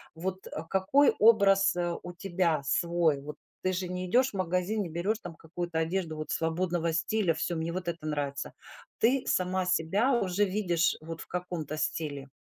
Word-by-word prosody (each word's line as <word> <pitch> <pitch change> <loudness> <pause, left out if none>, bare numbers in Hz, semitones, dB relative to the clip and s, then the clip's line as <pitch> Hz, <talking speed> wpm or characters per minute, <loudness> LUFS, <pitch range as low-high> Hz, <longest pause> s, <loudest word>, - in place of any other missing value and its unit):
Вот, 185 +3 -4
э, 155 - -6
какой 195 +10 +4
образ, 200 -4 +5
а, 175 -1 -1
у 175 0 -8
тебя 175 -4 0
свой? 165 0 +2
Вот 150 +2 -7 0.3
ты 185 0 +1
же 185 0 -2
не 180 0 -3
идешь 255 +6 +4
в - - -32
магазин, 185 +3 0
не 180 - -3
берешь 185 +7 -1
там 165 - -8
какую-то 165 +1 -4
одежду 165 0 -1
вот 155 0 -6
свободного 170 0 0
стиля: 170 +2 +1
"Всё, 170 +2 -2
мне 165 +1 -2
вот 185 -1 -4
это 170 -2 -4
нравится". 145 -2 -3 0.5
Ты 250 +4 +3
сама 185 0 +1
себя 185 +8 +2
уже 200 -3 +2
видишь 180 -4 +1
вот 165 +1 -7
в - - -9
каком-то 175 -4 -4
стиле. 145 -3 -2
175 Hz, 180 wpm, -29 LUFS, 160-190 Hz, 0.5 s, образ